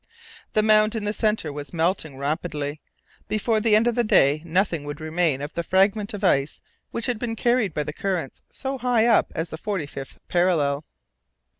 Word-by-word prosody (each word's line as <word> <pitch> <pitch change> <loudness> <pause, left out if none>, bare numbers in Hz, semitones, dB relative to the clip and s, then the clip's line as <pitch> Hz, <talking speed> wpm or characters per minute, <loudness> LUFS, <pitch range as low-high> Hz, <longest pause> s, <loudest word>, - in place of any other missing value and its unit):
The 215 - +3
mound 215 +1 +4
in 220 - -2
the 210 0 -1
center 210 -9 0
was 145 +2 -7
melting 160 -4 0
rapidly; 150 0 -3 0.5
before 215 +1 +1
the 215 -1 +4
end 220 +2 +4
of 240 - +2
the 240 +1 +1
day 150 -8 +4
nothing 170 -2 0
would 145 +1 -6
remain 155 -3 0
of 145 - -6
the 170 - -1
fragment 200 +4 +1
of 205 - -8
ice 140 -6 +2 0.3
which 230 - -3
had 245 -3 -1
been 230 -1 -3
carried 240 -4 +2
by 150 -1 -2
the - - -5
currents 185 -10 -3
so 265 0 -4
high 245 -3 +2
up 235 -2 +3
as 165 0 -3
the 160 - -6
forty 195 -6 -2
fifth 135 -1 -9
parallel. 155 -5 +1
185 Hz, 190 wpm, -24 LUFS, 150-215 Hz, 0.5 s, mound